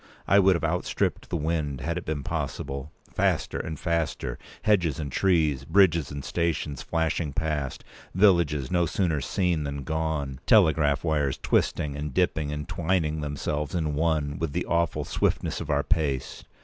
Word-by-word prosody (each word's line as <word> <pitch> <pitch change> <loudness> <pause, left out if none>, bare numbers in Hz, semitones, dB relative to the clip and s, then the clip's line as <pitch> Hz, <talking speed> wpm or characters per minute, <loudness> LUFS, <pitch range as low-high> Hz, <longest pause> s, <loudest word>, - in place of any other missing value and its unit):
I 100 - +6
would 95 -1 +5
have 85 - -3
outstripped 85 +2 -1
the - - -2
wind, 75 -3 -2
had 85 +1 -2
it 90 - -5
been 75 -3 -3
possible. 70 +3 -4 0.2
Faster - - 0
and 80 -2 -5
faster—hedges 85 - -1
and 75 -4 -4
trees, 80 -6 +2
bridges 85 -2 +3
and 70 -1 -6
stations, 80 -5 -1
flashing 80 -2 -1
past—villages 75 +1 0
no 85 -2 +2
sooner 80 -5 0
seen 85 -2 0
than 70 -1 -4
gone—telegraph 80 - +2
wires 75 -4 0
twisting, 70 -2 0
and 75 -2 -5
p. - - +4
216dipping, 75 -2 -4
and 75 +1 -4
twining 85 -3 0
themselves 75 0 -3
in 80 -3 0
one, 75 -2 0
with 80 -4 -2
the - - -1
awful 85 -1 0
swiftness - - -1
of - - -6
our 70 -1 +2
pace! 75 -7 -1
80 Hz, 150 wpm, -26 LUFS, 70-85 Hz, 0.2 s, I